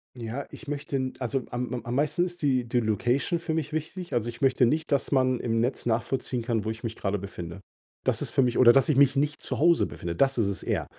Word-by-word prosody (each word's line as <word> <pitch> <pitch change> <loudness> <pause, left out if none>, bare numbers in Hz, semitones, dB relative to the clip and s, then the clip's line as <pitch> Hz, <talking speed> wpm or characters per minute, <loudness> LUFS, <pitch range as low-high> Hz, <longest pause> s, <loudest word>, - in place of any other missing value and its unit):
Ja, 120 +3 -5
ich 155 - -11
möchte 140 -2 -2
also, 130 +1 -1
am 125 +1 -3
am 120 -2 -5
am 120 +1 -3
meisten 150 +5 +1
ist 175 -2 -5
die 130 -4 +2
die 120 +1 +1
Location 120 - 0
für 160 -1 -3
mich 155 -1 -3
wichtig. 170 +3 -4
Also, 120 -1 0
ich 115 0 -9
möchte 130 -2 +4
nicht, 155 +5 -1
dass 140 0 +1
man 130 -2 +2
im 115 -1 0
Netz 125 +1 -1
nachvollziehen 120 +2 -1
kann, 115 -3 -1
wo 110 - -1
ich 110 +2 -6
mich 115 -1 -4
gerade 100 0 -1
befinde. 90 -2 -7 0.4
Das - - +2
ist - - -1
für 135 - +2
mich 125 -1 0
oder 120 -2 +8
dass 135 +1 +4
ich 150 - +3
mich 140 -1 +5
nicht 145 +1 0
zu - - -3
Hause 170 +2 +4
befinde, 85 -1 -5
das 135 +5 +2
ist 110 - +2
es 100 - -2
eher. - - -1
125 Hz, 250 wpm, -27 LUFS, 115-145 Hz, 0.4 s, oder